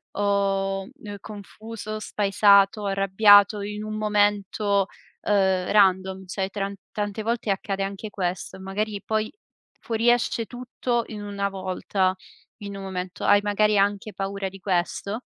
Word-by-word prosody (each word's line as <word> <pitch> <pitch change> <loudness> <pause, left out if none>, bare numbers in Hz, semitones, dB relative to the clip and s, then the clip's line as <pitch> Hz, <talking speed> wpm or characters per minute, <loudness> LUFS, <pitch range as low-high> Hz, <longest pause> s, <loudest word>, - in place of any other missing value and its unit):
o, 195 -1 0
ehm, 205 -1 -6
confuso, 215 +1 -8
spaesato, 200 0 +3
arrabbiato 200 +1 +5
in 210 +1 -5
un 215 0 -4
momento, 205 -1 +1 0.3
ehm, 190 -3 +2
random, 190 -1 +3
cioè 190 +1 -2
tran 200 0 -4 0.2
tante 205 +1 -3
volte 230 0 -2
accade 195 0 -2
anche 200 +2 -5
questo. 185 -1 -4
Magari 200 +2 -3
poi 220 0 -1 0.5
fuoriesce 230 0 +1
tutto 245 -1 -2
in 210 -2 -7
una 200 -1 -2
volta, 185 0 -1 0.4
in 200 -2 -7
un 195 - -7
momento. 185 -1 -5
Hai 205 - +6
magari 210 0 +2
anche 205 +1 +1
paura 195 0 -3
di 195 +1 -13
questo? 195 +4 -2
200 Hz, 130 wpm, -25 LUFS, 195-210 Hz, 0.5 s, Hai